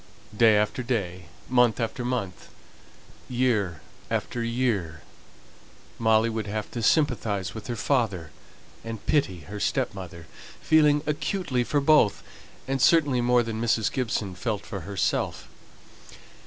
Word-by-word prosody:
Day 110 -1 +5
after 105 +6 0
day, 95 -8 -3 0.2
month 125 -4 +3
after 115 +1 -2
month, 120 -8 -4 0.8
year 115 - 0 0.3
after 120 - -2
year, 115 - -1 1.0
would - - -7
Molly 110 0 +2
have 105 0 -4
to 120 - -4
sympathize 110 - +1
with 110 - -8
her 120 - -3
father, 110 - -1 0.5
and 115 -2 -7
pity 95 - +1
her 105 +5 -8
stepmother, 90 -4 -3 0.3
feeling 150 -2 +4
acutely 150 -3 -1
for 145 +4 0
both, 140 -8 +4 0.4
and 135 -1 -1
certainly 145 -6 +4
more 120 0 +3
than 110 -1 -4
Mrs. 115 -2 +1
Gibson 110 -6 -2
felt 105 +3 -3
for 100 - -5
herself. 100 +1 -2
115 Hz, 125 wpm, -26 LUFS, 100-125 Hz, 1.0 s, Day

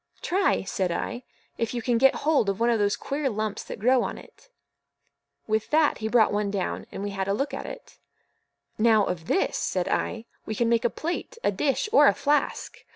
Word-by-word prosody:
"Try," 385 - +1
said 190 -1 -2
I, 240 +8 -3 0.4
"if 230 +1 -2
you 240 - -3
can 240 -1 +1
get 270 +1 +5
hold 295 -10 +3
of 195 +1 -2
one 235 +1 +3
of 230 - +1
those 205 0 +2
queer 280 0 -2
lumps 215 -2 -3
that - - -7
grow 250 +4 +3
on - - -3
it." - - -16 1.0
With 220 0 -1
that 305 0 +3
he 220 - -2
brought 220 -2 +3
one 205 0 0
down, 200 -2 -3
and 195 - -6
we 205 - -3
had 195 -1 -3
a 195 - +1
look 275 +5 -2
at - - -5
it. - - -11 0.8
"Now, 220 -2 +4
of 170 -2 -4
this," 195 - +1
said 180 -2 -1
I, 225 0 -2 0.2
"we 220 - -5
can 235 +2 +1
make 235 +1 +2
a - - +4
plate, 350 - -5
a - - +2
dish, 275 - 0
or 295 -10 +7
a - - +4
flask. 290 +1 -1
230 Hz, 215 wpm, -26 LUFS, 205-275 Hz, 1.0 s, or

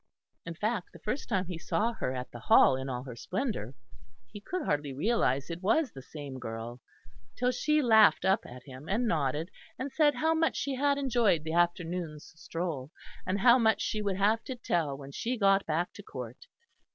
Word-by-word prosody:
In 165 - -5
fact, 210 +1 -2
the - - -11
first 250 +7 -3
time 190 -4 +1
he 175 -2 -6
saw 225 +6 0
her 130 - -3
at 125 0 -5
the 120 - -9
Hall 130 - +6
in 130 +1 -4
all 125 -1 -3
her 125 -3 -8
splendour, 180 - -3 0.6
he 205 - -9
could 365 - -3
hardly 145 -1 -1
realise 145 - +1
it 170 +1 -6
was 260 +9 +2
the 135 - -10
same 140 -1 -8
girl, 115 +1 -6 0.6
till 250 0 +2
she 300 +4 +1
laughed 220 -3 +6
up 190 +4 +3
at 125 +1 -11
him, 135 +2 -11
and 230 +5 +1
nodded, 155 0 -1 0.3
and 265 +2 -4
said 295 0 +3
how 320 +6 +2
much 325 0 +1
she 280 - -2
had 280 +2 +2
enjoyed 235 - +2
the 160 0 -4
afternoon's 175 -2 -1
stroll, 160 -5 -4 0.4
and 190 +1 0
how 245 +1 +7
much 220 -2 +3
she 215 - -1
would 200 -2 -1
have 215 +3 +2
to 260 - -4
tell 165 - -1
when 140 0 -10
she 245 - -2
got 195 -2 +3
back 165 +3 -1
to - - -10
Court. 125 - -9
180 Hz, 200 wpm, -30 LUFS, 140-235 Hz, 0.6 s, how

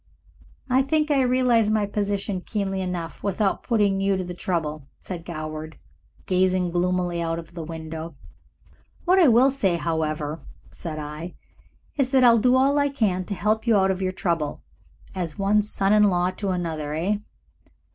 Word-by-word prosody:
"I 260 0 +3
think 305 +2 +1
I 275 -2 +4
realize 250 -3 +3
my 215 -1 +2
position 200 -1 -2
keenly 195 -1 -2
enough 180 -3 -5
without 200 0 0
putting 205 -5 +1
you 195 0 +2
to 185 - -2
the 180 0 -6
trouble," 155 -5 -3
said 175 -3 -7
Goward, 155 -1 -6 0.5
gazing 185 -1 +1
gloomily 175 0 0
out 165 0 -1
of 165 0 -9
the 170 -2 -6
window. 160 0 -7 0.9
"What 370 +2 +4
I 345 - +6
will 250 +3 +5
say, 200 -10 +1
however," 155 -1 -2 0.3
said 160 -3 -6
I, 150 +3 -6 0.6
"is 270 -3 +1
that 260 -1 +4
I'll 235 -2 +7
do 250 +3 +4
all 275 +2 +3
I 285 0 +2
can 205 -9 0
to 200 - -4
help 215 +4 0
you 225 -3 +5
out 190 0 +3
of 190 0 -3
your 185 -1 0
trouble. 165 -5 -2 0.5
As 175 -5 -4
one 200 +2 +3
son 200 -1 +1
in 210 - +5
law 180 0 +1
to 195 +1 -4
another, 160 -5 -2
eh?" 190 +6 0
185 Hz, 170 wpm, -24 LUFS, 165-215 Hz, 0.9 s, I'll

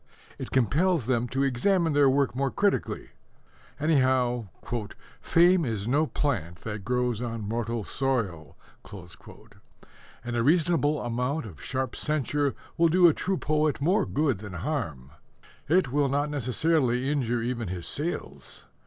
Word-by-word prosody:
It - - -5
compels 145 - +2
them 120 -1 0
to 135 +3 -1
examine 160 +6 +1
their 145 -1 +5
work 135 -2 +1
more 135 +1 0
critically. 200 +6 -1 0.7
Anyhow, 130 -6 +2 0.7
"fame 175 +1 +4
is 110 -5 -2
no 145 +5 +2
plant 90 - -2
that 105 -2 -6
grows 125 -1 0
on 115 -3 -4
mortal 115 0 -2
soil," 105 - -2 1.7
and 120 0 -4
a 120 - +1
reasonable 155 +1 +2
amount 125 +5 -2
of 90 -9 -11
sharp 130 -2 -3
censure 145 -1 0 0.2
will 170 0 +5
do 175 +1 +6
a 165 - +5
true 190 +4 -1
poet 155 -1 0
more 180 +9 +2
good 140 -8 0
than 105 -2 -8
harm. 85 - -4 0.6
It 165 -5 +3
will 145 0 +2
not 145 +2 0
necessarily 130 -1 +1
injure 120 -5 0
even 120 -2 -2
his 90 -1 -5
sales. 160 +5 -5
130 Hz, 135 wpm, -27 LUFS, 120-155 Hz, 1.7 s, do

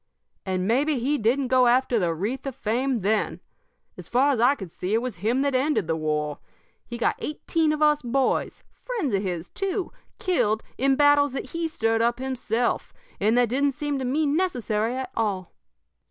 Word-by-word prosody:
"And 185 0 -1
maybe 275 +6 +2
he 275 +5 0
didn't 250 +4 +1
go 255 -1 +5
after 245 -1 +3
the 175 -4 +1
wreath 210 - -3
of 270 - -4
fame 245 +2 -1
then! 215 +3 0 0.6
As - - -9
far 265 +4 +3
as 260 - 0
I 250 +5 +5
could 190 - -9
see 185 +5 -2
it 225 - +2
was 250 -6 -4
him 230 +9 +1
that 280 -1 0
ended 265 - +1
the 160 - -1
war. 150 -2 -2 0.5
He 240 - -6
got 235 - 0
eighteen 310 +1 0
of 305 0 0
us 300 -1 +4
boys 260 +1 0
friends 435 - -3
of 195 - +2
his, 180 -3 -4
too 390 -1 -2 0.3
killed 220 - +1
in 270 +1 +2
battles 290 -1 +4
that 270 - -5
he 335 0 -1
stirred 225 -7 0
up 235 +1 +2
himself, 245 -2 -2 0.2
and 215 +4 +2
that 245 -2 +3
didn't 275 +3 +1
seem 290 0 -2
to 260 - -3
me 295 +5 +1
necessary 250 - 0
at 260 -1 -4
all. 200 -5 -1
250 Hz, 190 wpm, -25 LUFS, 220-285 Hz, 0.6 s, go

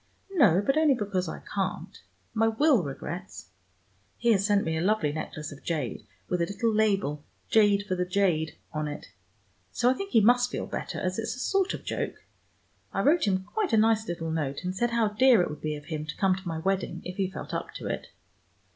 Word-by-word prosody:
"No, 205 - +4
but 275 +6 +3
only 305 -4 +4
because 195 -6 -2
I - - -7
can't. 195 -2 -4 0.3
My 225 0 +3
will 255 +1 +4
regrets. 170 +5 -7 0.7
He 235 - +3
has 200 -3 +3
sent 205 -1 +3
me 160 0 -1
a 160 - -1
lovely 185 -5 +2
necklace 155 0 -5
of 145 - -11
jade, 150 -8 -3 0.2
with 180 -1 0
a 170 - +1
little 220 +3 0
label, 195 -9 +1 0.3
'Jade 205 -2 +4
for 185 - -2
the 180 0 0
jade,' 180 -4 +1 0.2
on 155 0 -2
it. 145 -9 -7 0.6
So 245 - +3
I - - +3
think 395 +8 -5
he 225 - +7
must 245 +3 +4
feel - - -3
better, - - -5
as 185 +3 -2
it's 225 - -2
a - - -9
sort 390 +7 +1
of - - -11
joke. - - -3 0.7
I - - 0
wrote 310 -4 +4
him 190 -1 +1
quite 405 - -2
a - - +5
nice 220 0 +3
little 165 -2 -3
note, 145 -2 -2
and 180 +1 -3
said 240 +5 +1
how 230 -2 +2
dear 240 +2 +5
it - - -3
would 150 - -8
be 155 -1 -2
of 145 -1 -10
him 155 -1 -4
to 150 - -6
come 190 -2 +3
to 190 0 -9
my 165 -1 -2
wedding, 190 +3 -1
if 180 +2 -6
he 190 -2 0
felt 190 - -7
up - - -3
to - - -7
it." - - -3
195 Hz, 220 wpm, -28 LUFS, 165-225 Hz, 0.7 s, he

